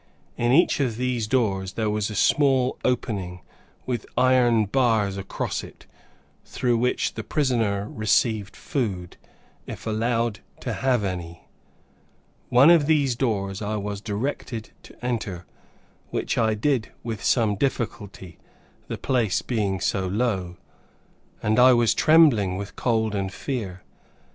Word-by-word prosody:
In 120 0 +1
each 155 +4 +4
of 125 -6 0
these 125 -3 -1
doors 95 -6 0
there 110 -1 -1
was 105 0 -1
a 105 - -6
small 135 +2 +3
opening, 100 -8 -2 0.4
with 120 -3 -3
iron 125 -4 +4
bars 110 -3 +1
across 100 0 -4
it, - - -13 0.6
through 120 -2 0
which 125 +1 0
the 110 - -5
prisoner 110 -6 0
received 110 -1 0
food, 95 - -3 0.5
if - - -8
allowed 115 0 0 0.2
to - - -3
have 125 -4 +1
any. 85 -3 -5 1.0
One 130 +6 +7
of 160 -4 +4
these 145 -5 +2
doors 100 -6 -2
I 105 +1 -2
was 100 -1 -4
directed 110 +1 -4
to - - -13
enter, 105 -8 -3 0.6
which - - -2
I 110 -1 +2
did 125 0 0
with 110 -3 -5
some 115 -4 +2
difficulty, 100 -6 -4 0.5
the - - -4
place 120 -7 0
being 100 -6 -1
so 95 +1 -1
low, 95 -4 -1 0.9
and 110 +2 +2
I 130 +1 +8
was 120 -2 +3
trembling 135 - +4
with 100 +1 -7
cold 110 -3 0
and 95 -2 -2
fear. 100 -6 -5
110 Hz, 135 wpm, -24 LUFS, 100-125 Hz, 1.0 s, I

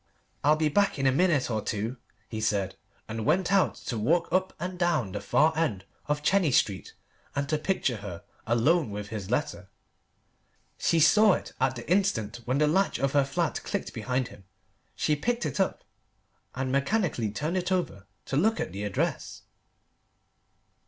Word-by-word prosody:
"I'll 150 +2 +5
be 155 0 +1
back 200 +5 +2
in 135 - -1
a 135 - +5
minute 150 -4 +2
or 110 -1 0
two," 110 +6 -3 0.3
he 110 -1 -5
said, 100 -3 0 0.3
and 110 0 -4
went 185 - +2
out 195 -4 +3
to 115 - -2
walk 165 +10 +2
up 185 0 +2
and 180 +2 -5
down 165 - +1
the 105 - -4
far 160 +2 +3
end 110 - -1 0.2
of 150 0 -1
Chenies 175 -6 +3
Street 95 -2 -1 0.4
and 140 0 -1
to 155 -1 +1
picture 150 - 0
her 100 -3 -8 0.2
alone 125 +6 +3
with 105 0 -6
his 105 -4 -5
letter. - - -2 1.1
She 165 - +2
saw 210 +6 +6
it - - -4
at 130 0 +2
the 120 - -8
instant 155 - +1
when 130 +2 0
the 150 - +4
latch 190 +6 +2
of 135 0 0
her 140 -1 +4
flat 135 0 -1
clicked - - -3
behind 130 -1 -2
him. 100 - -14 0.5
She 150 - +1
picked 235 +10 -1
it - - -3
up, 190 - 0 0.7
and 130 0 -2
mechanically 140 - 0
turned 150 - -2
it 180 0 -2
over 135 - -2 0.2
to - - -3
look 220 +10 +2
at - - -2
the 100 +3 -6
address. 105 -2 -2
140 Hz, 175 wpm, -28 LUFS, 110-175 Hz, 1.1 s, saw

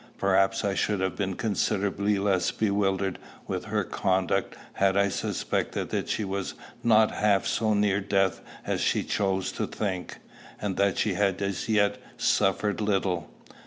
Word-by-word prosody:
Perhaps 95 0 +2
I 100 - +1
should 105 0 0
have 95 0 -1
been 95 -2 -2
considerably 100 -1 0
less 95 -3 +1
bewildered 100 -2 0 0.3
with - - -4
her - - 0
conduct 95 -1 0 0.2
had 95 0 +2
I 100 0 +3
suspected - - -2
that - - -2
she 110 - 0
was 100 -1 -3 0.3
not 110 -2 +5
half 105 -2 +2
so 110 -1 +1
near 100 -1 +2
death 95 -1 +1 0.2
as - - -1
she - - +1
chose 95 -2 0
to - - -3
think, 95 -4 -4 0.4
and 100 -3 -2
that 100 -2 +2
she 105 - +1
had 95 0 +1
as 100 +2 -3
yet 105 -2 +2 0.2
suffered 100 +2 +1
little. 95 -5 0
100 Hz, 155 wpm, -27 LUFS, 95-105 Hz, 0.4 s, not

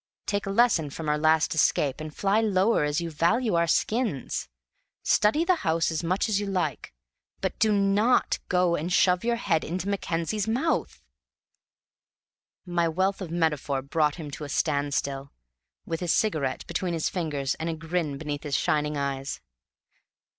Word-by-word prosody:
Take 200 -1 -2
a - - -1
lesson 195 -8 +3
from 155 +3 -6
our 150 0 +2
last 160 +3 +3
escape, 150 -2 +1
and 155 0 -6
fly 200 +7 +1
lower 205 -2 +2
as 150 0 0
you 170 -1 -4
value 210 +9 +1
our 170 0 +2
skins. 215 - -1 0.5
Study 295 +11 +3
the 365 0 +3
house 165 - 0
as 160 +1 -2
much 185 +6 0
as 210 -2 +1
you 205 - -3
like, 190 -2 -2 0.5
but - - -3
do 220 - +3
not 205 +4 +2
go 180 -1 +3
and 170 +4 -3
shove 180 +1 +3
your 235 0 +1
head 165 -8 0
into 180 +4 -4
Mackenzie's 200 +1 -1
mouth!" 265 +7 -1 1.6
My 175 -1 +1
wealth 190 +5 0
of 185 - -5
metaphor 150 -5 0
brought 150 +1 +1
him 155 -4 -7
to 150 - -7
a 145 - -6
stand 145 -1 0
still, 140 0 -3 0.5
with 165 -1 -3
his 175 -2 0
cigarette 155 -11 0
between 180 -2 -2
his 160 - 0
fingers 145 -6 -2
and 160 +1 -2
a 165 - -2
grin 160 -3 -2
beneath 145 -1 -4
his 145 -2 -1
shining 150 -1 0
eyes. 140 -1 -3
170 Hz, 170 wpm, -26 LUFS, 150-195 Hz, 1.6 s, lesson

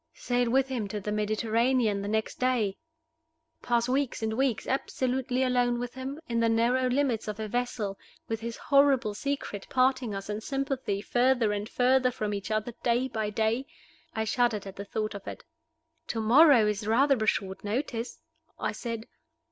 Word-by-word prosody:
Sail 245 -1 0
with 265 +2 +3
him 245 -6 -2
to 210 +1 -4
the 210 +1 -4
Mediterranean 215 +1 +1
the 200 - -4
next 220 +1 -2
day? 245 -6 +1 0.9
Pass 235 -1 +1
weeks 265 -2 0
and 220 0 0
weeks 255 -1 0
absolutely 260 -1 -1
alone 245 -1 +2
with 245 0 -4
him, 265 +3 -6
in 235 -1 0
the 230 0 +3
narrow 245 +3 +2
limits 250 -4 0
of 210 0 -4
a 215 - -3
vessel, 220 -3 -2 0.3
with 225 -1 -2
his 230 +1 -5
horrible 275 -6 +3
secret 245 -4 -4
parting 255 -4 +2
us 195 0 -6
in 210 +1 -3
sympathy 270 -6 -2
further 245 -3 +2
and 205 +2 -4
further 255 +1 +3
from 215 -4 -3
each 200 +1 -4
other 215 +2 -1
day 245 +2 +1
by 220 -3 -2
day? 225 +5 0 0.5
I 220 - 0
shuddered 220 -2 +1
at 195 - -8
the 200 - -6
thought 215 +1 -3
of 200 -1 -9
it. - - -7 0.6
"To 225 - -2
morrow 245 +1 +6
is 210 0 -1
rather 260 +1 +3
a - - -1
short 190 -2 -1
notice," 230 +2 -3 0.4
I - - -1
said. 230 -2 -5
235 Hz, 175 wpm, -28 LUFS, 215-255 Hz, 0.9 s, morrow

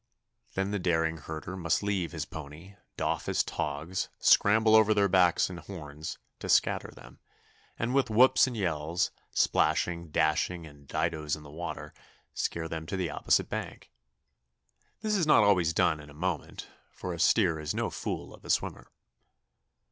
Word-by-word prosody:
Then 95 +1 -1
the 105 - -1
daring 80 -2 +1
herder 80 +4 -7
must 85 +1 0
leave 100 -4 -1
his - - -4
pony, 80 +5 -10 0.2
doff - - -1
his - - +2
togs, 80 +6 -3
scramble 110 +2 +5
over 110 -1 +5
their 100 -1 +4
backs 90 -2 +4
and 90 -2 -7
horns, 80 -5 -8 0.2
to - - -6
scatter - - +3
them, 60 - -15 0.6
and 120 +2 -1
with 135 -3 +2
whoops 130 +4 +5
and 125 -3 -5
yells, 85 -3 -1 0.2
splashing, 85 -1 +1
dashing, 80 +3 0
and 70 -2 -15
didos 75 0 -1
in 75 - -13
the 75 - -12
water, 85 +3 -6 0.4
scare 80 -1 -2
them 80 -1 -5
to 95 - -3
the 90 -4 -2
opposite - - +1
bank. - - -6 1.1
This 215 -1 0
is 175 -6 +1
not 130 -8 +6
always 90 -5 +4
done 85 -2 +2
in 75 0 -12
a 75 - -14
moment, 85 0 -4 0.2
for 90 - -6
a 85 - -7
steer 85 -2 +3
is 75 -1 -3
no - - -1
fool - - -5
of - - -16
a - - -11
swimmer. - - -1
85 Hz, 165 wpm, -29 LUFS, 80-100 Hz, 1.1 s, not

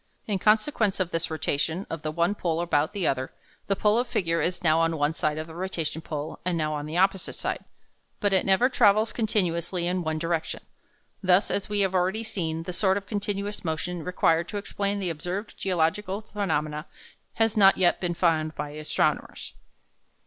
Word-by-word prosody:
In 200 -3 -1
consequence 215 0 +2
of 180 -2 -1
this 165 0 0
rotation 160 +3 -1
of 165 - -5
the 155 - -3
one 170 +5 +1
pole 170 -5 -1
about 155 -3 +1
the 200 -4 -2
other, 130 -2 0 0.4
the 195 - +2
pole 210 +3 +3
of 245 - 0
figure 165 -7 0
is 180 +1 -2
now 160 -1 +4
on 165 0 +1
one 145 +1 +1
side 155 -1 -1
of 155 - -3
the 160 - -11
rotation 165 -3 -3
pole 155 -1 -5
and 180 -1 0
now 155 -1 0
on 150 0 -4
the 160 +3 -3
opposite 190 0 +2
side, - - -3 0.6
but 205 -1 +1
it 190 - +3
never 195 +6 +4
travels 215 -4 +4
continuously 180 -5 0
in 180 +1 0
one 160 -1 -1
direction. 165 0 -2 0.6
Thus, 185 +1 +3
as 200 - -2
we 205 -1 +1
have 190 -1 +1
already 190 +4 +1
seen, 165 -6 -3
the 180 - -5
sort 190 +1 +2
of 200 - -5
continuous 205 0 -3
motion 170 +1 -3
required 170 -1 +2
to 210 - -4
explain 200 0 -2
the 185 -3 -1
observed 180 +7 -5
geological 190 +2 0
phenomena 155 -8 -2 0.5
has 225 -1 +2
not 195 -2 +6
yet 180 -2 +3
been 175 -2 -1
found 160 -3 +1
by 150 0 -4
astronomers. 155 +1 -1
180 Hz, 190 wpm, -26 LUFS, 160-200 Hz, 0.6 s, not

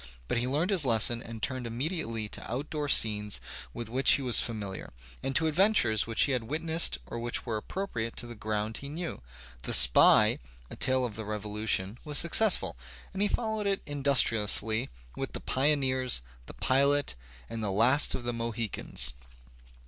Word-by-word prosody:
But - - -1
he 120 - -2
learned 155 +9 -1
his 185 -6 +3
lesson 115 -1 +1
and 115 -1 -10
turned 130 0 -4
immedi 140 +10 -4
ately 115 -5 -5
to - - -8
outdoor 145 +3 -4
scenes 105 -4 +3 0.3
with 120 - -7
which 130 +4 +5
he 140 - 0
was 125 -2 +5
familiar, 100 - -6 0.3
and 135 - -4
to 160 - +2
adventures 155 - +2
which 115 -1 +4
he 140 - 0
had 125 -3 -1
witnessed 160 - 0
or 120 - -7
which 120 0 -3
were 110 -3 -4
appro 195 - -6
priate 115 -7 -5
to - - -2
the 120 - -9
ground 105 0 -4
he 140 - -8
knew. 165 - -7 0.4
"The - - -3
Spy," 65 -1 +6 0.3
a - - -8
tale 130 -1 0
of 110 -4 -6
the 110 - -6
Revolution, 105 0 -2
was 150 -1 -4
successful, 190 - +4 0.4
and 195 - -5
he 205 - +2
followed 220 -2 -3
it 195 -1 -2
industri 140 -6 +2
ously 110 +2 +2 0.3
with - - -6
"The - - -5
Pioneers," 130 - 0 0.3
"The - - -11
Pilot," 140 - +1 0.3
"The 110 -3 -4
Last 120 +9 +4
of 125 - -7
the 120 0 -3
Mohicans." 115 -2 -3
120 Hz, 180 wpm, -28 LUFS, 110-145 Hz, 0.4 s, Spy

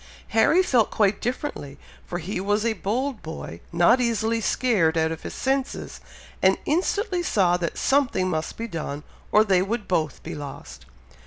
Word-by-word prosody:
Harry 320 +11 +4
felt 245 - +3
quite 205 -2 +1
differently, 240 - -4 0.3
for 175 - -3
he 180 +2 -4
was 205 +3 0
a 230 - +2
bold 230 +6 -2
boy, 155 - -7
not 175 +9 +4
easily 230 -1 0
scared 195 -11 +2
out 160 0 +2
of 160 - -5
his - - -7
senses, 270 0 -2 0.4
and 190 0 +4
instantly 370 +4 0
saw 190 - +2
that 175 -1 -3
something 265 -9 +2
must 160 -3 -3
be 230 - -4
done, 150 -6 -5 0.3
or 215 - +6
they 190 -4 +3
would 210 +3 -2
both 155 -5 -1
be - - -6
lost. 70 - -9
205 Hz, 165 wpm, -24 LUFS, 170-245 Hz, 0.4 s, or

